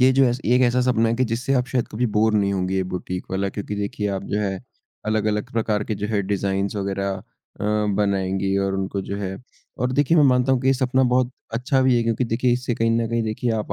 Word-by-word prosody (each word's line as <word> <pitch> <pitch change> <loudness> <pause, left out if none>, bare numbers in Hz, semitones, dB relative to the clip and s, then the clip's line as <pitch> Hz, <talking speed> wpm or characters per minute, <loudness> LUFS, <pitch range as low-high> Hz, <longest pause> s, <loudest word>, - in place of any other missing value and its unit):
ये 130 +1 +6
जो 135 - +7
ऐस 120 0 +1
एक 125 +3 +4
ऐसा 125 0 +3
सपना 120 -3 +2
है 115 - +1
कि 130 - +2
जिससे 125 +4 -1
आप 125 -1 +1
शायद 125 -1 -1
कभी 120 +3 -1
बोर 110 0 +3
नहीं 100 -1 +2
होंगे 95 -1 -1
ये 95 - +1
बुटीक 90 0 -4
वाला, 95 +1 0
क्योंकि 105 +1 -5
देखिए 105 0 -2
आप 100 -1 -3
जो 105 - -2
है 95 -2 -1 0.5
अलग-अलग 110 +1 0
प्रकार 110 -2 0
के 110 - -2
जो 105 +1 -3
है, 105 -2 0
डिज़ाइन्स 100 +1 -1
वग़ैरह 100 0 -2 0.5
अ, - - -2 0.3
बनाएँगे 95 -1 0
और 95 0 -1
उनको 95 0 -2
जो 100 - -3
है 95 -1 -4 0.4
और 125 0 0
देखिए 145 +4 +3
मैं 155 - +6
मानता 130 0 +3
हूँ 130 - +2
कि 130 - -2
ये 135 - +6
सपना 130 0 +1
बहुत 125 0 +2 0.2
अच्छा 130 +4 +1
भी 130 -1 +4
है, 120 - +2
क्योंकि 115 +2 0
देखिए 120 +2 +1
इससे 125 0 -1
कहीं 115 0 +1
न 115 0 +1
कहीं 115 0 0
देखिए 110 +2 -2
आप 110 -2 -2
110 Hz, 245 wpm, -23 LUFS, 100-125 Hz, 0.5 s, जो